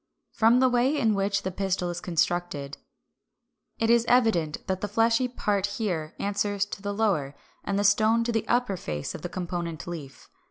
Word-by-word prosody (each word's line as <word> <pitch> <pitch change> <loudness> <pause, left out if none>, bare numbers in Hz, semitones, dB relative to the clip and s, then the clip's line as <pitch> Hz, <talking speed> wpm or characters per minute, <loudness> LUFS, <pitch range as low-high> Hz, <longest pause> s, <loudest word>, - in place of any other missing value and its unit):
From 230 +3 +4
the 260 - +5
way 250 +4 +2
in 225 -6 +2
which 200 0 0
the 190 - -2
pistil 185 -1 -1
is 175 0 -6
constructed, 170 -4 -1 1.0
it 225 0 +2
is 235 -1 +5
evident 220 -11 +2
that 190 -1 -2
the 205 - -1
fleshy 225 +4 +2
part 205 -5 -1
here 170 -8 -2
answers 205 0 -1
to 205 - -8
the 205 0 -3
lower, 195 -10 0 0.3
and 200 - -1
the 205 - +1
stone 215 +3 +4
to 235 - -1
the 225 -1 -1
upper 240 -6 +1
face 75 - -4
of - - -8
the 175 - -5
component 170 -4 -4
leaf. 160 -6 -8
200 Hz, 185 wpm, -27 LUFS, 175-225 Hz, 1.0 s, the